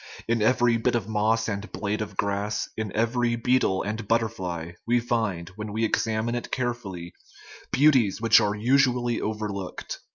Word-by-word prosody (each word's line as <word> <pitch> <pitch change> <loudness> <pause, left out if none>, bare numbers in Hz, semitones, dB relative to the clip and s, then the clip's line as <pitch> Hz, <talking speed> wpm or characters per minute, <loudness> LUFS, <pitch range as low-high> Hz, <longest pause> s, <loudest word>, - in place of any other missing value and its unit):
In 115 -1 +1
every 120 +1 +3
bit 120 +2 +1
of 110 -4 -1
moss 110 +1 +1
and 100 0 -4
blade 105 +1 -2
of 105 -3 -6
grass, 100 +1 -1
in 110 -2 -3
every 120 +1 +1
beetle 120 -5 +1
and 110 +1 -4
butterfly, 95 -8 -1 0.2
we 120 +1 +3
find, 110 -8 -1
when 105 -1 -5
we 110 +2 0
exam 110 0 0
ine 120 - -1
it 120 - -4
carefully, 110 -9 -4 0.6
beauties 130 -8 +4
which 115 0 +6
are 105 0 0
usually 120 0 +2
overlooked. 105 -3 -4
110 Hz, 160 wpm, -26 LUFS, 105-120 Hz, 0.6 s, which